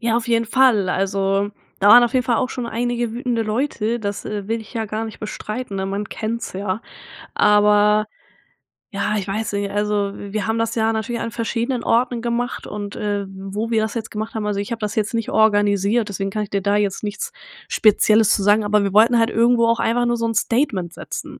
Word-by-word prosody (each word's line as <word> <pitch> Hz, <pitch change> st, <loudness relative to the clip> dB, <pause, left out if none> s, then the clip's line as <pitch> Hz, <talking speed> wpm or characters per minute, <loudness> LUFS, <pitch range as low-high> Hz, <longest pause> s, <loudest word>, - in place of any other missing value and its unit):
Ja, 235 Hz, -1 st, +1 dB
auf 240 Hz, 0 st, -2 dB
jeden 230 Hz, 0 st, +2 dB
Fall. 225 Hz, -5 st, +3 dB
Also, 195 Hz, +1 st, 0 dB, 0.3 s
da 200 Hz, -, +4 dB
waren 240 Hz, +3 st, +9 dB
auf 240 Hz, -, -2 dB
jeden 255 Hz, -1 st, +2 dB
Fall 235 Hz, -2 st, +1 dB
auch 255 Hz, -, 0 dB
schon 245 Hz, -2 st, -4 dB
einige 240 Hz, 0 st, -2 dB
wütende 240 Hz, -1 st, -1 dB
Leute, 230 Hz, 0 st, -1 dB
das, 200 Hz, -1 st, -4 dB
äh, 205 Hz, -1 st, -5 dB
will 225 Hz, 0 st, -1 dB
ich 220 Hz, -, -13 dB
ja 225 Hz, -1 st, -1 dB
gar 215 Hz, +2 st, -3 dB
nicht 220 Hz, -, -9 dB
bestreiten, 215 Hz, 0 st, -5 dB
ne? 190 Hz, 0 st, -2 dB
Man 200 Hz, +1 st, -3 dB
kennt's 230 Hz, +2 st, -4 dB
ja. 190 Hz, +2 st, -3 dB, 0.5 s
Aber 210 Hz, 0 st, +4 dB, 0.9 s
ja, 210 Hz, +1 st, -1 dB
ich 195 Hz, -, -4 dB
weiß 205 Hz, +2 st, -3 dB
nicht, 200 Hz, 0 st, -1 dB
also 205 Hz, -1 st, 0 dB
wir 205 Hz, +2 st, -4 dB
haben 225 Hz, +1 st, 0 dB
das 230 Hz, 0 st, -1 dB
ja 225 Hz, -1 st, +1 dB
natürlich 225 Hz, +2 st, -3 dB
an 230 Hz, -, -3 dB
verschiedenen 235 Hz, +2 st, -2 dB
Orten 240 Hz, 0 st, +1 dB
gemacht 240 Hz, +1 st, -2 dB
und, 205 Hz, -1 st, -6 dB
äh, 205 Hz, -1 st, -2 dB
wo 195 Hz, +4 st, -5 dB
wir 220 Hz, -2 st, +2 dB
das 220 Hz, -, -3 dB
jetzt 225 Hz, -2 st, -4 dB
gemacht 215 Hz, +1 st, -5 dB
haben 215 Hz, -2 st, -3 dB
also 200 Hz, -1 st, -1 dB
ich 205 Hz, +4 st, -5 dB
habe 230 Hz, -, -3 dB
das 210 Hz, -1 st, -3 dB
jetzt 215 Hz, +1 st, -1 dB
nicht 230 Hz, -1 st, -2 dB
organisiert, 205 Hz, +1 st, +2 dB
deswegen 195 Hz, 0 st, -3 dB
kann 215 Hz, -, -2 dB
ich 205 Hz, -, -4 dB
dir 200 Hz, -1 st, -2 dB
da 200 Hz, +1 st, +2 dB
jetzt 205 Hz, 0 st, -1 dB
nichts 205 Hz, 0 st, -4 dB, 0.4 s
Spezielles 215 Hz, 0 st, +4 dB
zu 200 Hz, -, -2 dB
sagen, 205 Hz, +2 st, +4 dB
aber 210 Hz, 0 st, +2 dB
wir 200 Hz, -, -1 dB
wollten 230 Hz, +3 st, +5 dB
halt 225 Hz, 0 st, +3 dB
irgendwo 235 Hz, 0 st, +3 dB
auch 230 Hz, 0 st, +2 dB
einfach 240 Hz, +1 st, +1 dB
nur 240 Hz, 0 st, +1 dB
so 230 Hz, -, -1 dB
'n 225 Hz, -, -1 dB
Statement 215 Hz, -, 0 dB
setzen. -, -, -7 dB
215 Hz, 220 wpm, -21 LUFS, 205-230 Hz, 0.9 s, waren